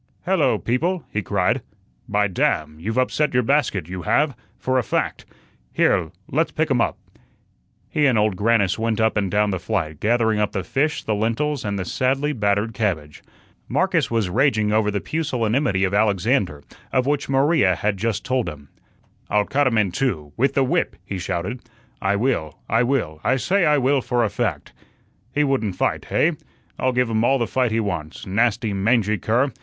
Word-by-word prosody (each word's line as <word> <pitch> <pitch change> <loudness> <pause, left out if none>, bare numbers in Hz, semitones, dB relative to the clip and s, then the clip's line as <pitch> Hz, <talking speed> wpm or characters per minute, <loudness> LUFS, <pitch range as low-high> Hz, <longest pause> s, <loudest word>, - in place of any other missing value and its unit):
"Hello, - - +2
people," 170 +9 -1
he 110 - 0
cried. 95 -2 0 0.5
"By 105 0 +2
damn! 80 -4 -1
you've 110 +8 -3
upset 130 +2 +1
your 125 - +4
basket 115 - +1
you 90 0 -5
have, 145 - +1 0.2
for 130 0 0
a - - -1
fact. - - -2 0.5
Here, 80 - +2 0.2
let's 160 +5 +1
pick 160 -1 -1
um 125 -3 +3
up." - - 0 0.9
He 150 -1 +2
and 125 -4 +3
Old 105 -2 +2
Grannis 100 -1 +2
went 115 -1 0
up 110 0 +2
and 100 -2 0
down 105 +1 +2
the 95 - -2
flight, 80 -3 -2
gathering 110 -1 +2
up 105 -1 0
the 95 - -2
fish, 150 +3 -1
the 110 - -1
lentils, 115 +7 -1
and 100 -1 -2
the 95 - -3
sadly 135 +8 0
battered 105 -1 0
cabbage. 85 -9 -2 0.5
Marcus - - +1
was 115 -4 0
raging 110 0 +2
over 110 -1 +2
the 100 -1 -2
pusillanimity 125 -8 0
of 95 0 0
Alexander, 100 - +1 0.3
of 130 -1 +1
which 145 0 -1
Maria 135 - +3
had 105 +2 -1
just 110 +1 -2
told 130 -2 0
him. 70 -2 -11 0.6
"I'll 105 -1 +2
cut 145 +3 +1
him 115 -3 +1
in 105 -4 +2
two 85 - -2
with 135 +3 +1
the 135 - +4
whip," 130 - 0
he 95 - -4
shouted. 90 +6 -3 0.4
"I 95 +1 +1
will, 100 - -1
I 115 +2 +2
will, 115 - -1
I 130 - +2
say 180 +8 +2
I 150 0 +4
will, 135 0 +2
for 120 -1 0
a 110 - +1
fact. 95 - -3 0.6
He 150 - +1
wouldn't 130 -9 0
fight, - - -1
hey? - - +2 0.5
I'll 130 - +2
give 125 -2 +1
um 110 0 +1
all 135 +3 +3
the 120 - 0
fight 125 +1 0
he 110 +1 0
wants, 90 -8 -4
nasty, 110 +1 +1
mangy 105 +1 +1
cur. 125 +9 +1
110 Hz, 185 wpm, -22 LUFS, 100-130 Hz, 0.9 s, your